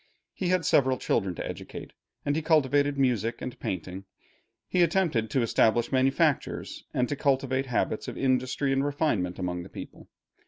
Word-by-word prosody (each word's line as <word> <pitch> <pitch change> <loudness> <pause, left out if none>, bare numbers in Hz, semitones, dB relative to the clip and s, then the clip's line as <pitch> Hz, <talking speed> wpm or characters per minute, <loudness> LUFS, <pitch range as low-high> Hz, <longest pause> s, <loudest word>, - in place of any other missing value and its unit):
He 185 - -3
had 180 -2 +1
several 130 -3 +3
children 95 -6 0
to - - -4
educate, - - -8 0.3
and 145 - +1
he 160 - 0
cultivated 145 -2 +2
music 120 -4 +1
and 125 - -6
painting. 95 +1 -5 0.6
He 180 - +1
attempted 165 - +2
to 130 +2 +1
establish 115 +1 +2
manufactures, 135 +3 +1
and 125 - 0
to 145 - -2
cultivate 135 -1 0
habits 120 -3 -1
of - - -6
industry 130 +1 +1
and 135 0 +1
refinement 140 - 0
among 90 -1 -3
the 90 - -10
people. - - -10
130 Hz, 160 wpm, -27 LUFS, 115-145 Hz, 0.6 s, several